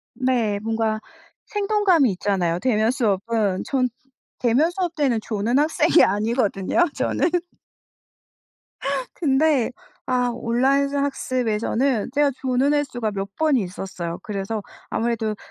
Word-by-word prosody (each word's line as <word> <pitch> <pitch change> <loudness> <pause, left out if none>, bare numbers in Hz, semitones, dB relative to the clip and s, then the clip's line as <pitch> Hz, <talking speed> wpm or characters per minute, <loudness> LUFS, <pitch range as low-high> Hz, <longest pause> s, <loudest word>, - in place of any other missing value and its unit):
네. 240 -6 0
뭔가 220 0 -1 0.5
생동감이 400 - +2
있잖아요, 180 -3 0
대면 220 -1 +2
수업은. 215 -4 0
전 255 -2 +1 0.5
대면 255 +7 +3
수업 355 -2 -2
때는 270 -8 +1
조는 225 +4 0
학생이 315 +2 +4
아니거든요, 215 - +1
저는. 320 +5 0 1.8
근데 280 -4 +2 0.3
아 250 -1 +1
온라인 265 +4 +1
수 285 - -2
학습에서는 255 -3 0
제가 290 0 +3
조는 265 +2 +2
횟수가 245 -7 -1
몇 195 0 -5
번 315 -2 +2
있었어요. 180 -5 -4
그래서 205 +1 -3 0.3
아무래도 225 -2 -1
245 Hz, 260 characters per minute, -23 LUFS, 210-280 Hz, 1.8 s, 학생이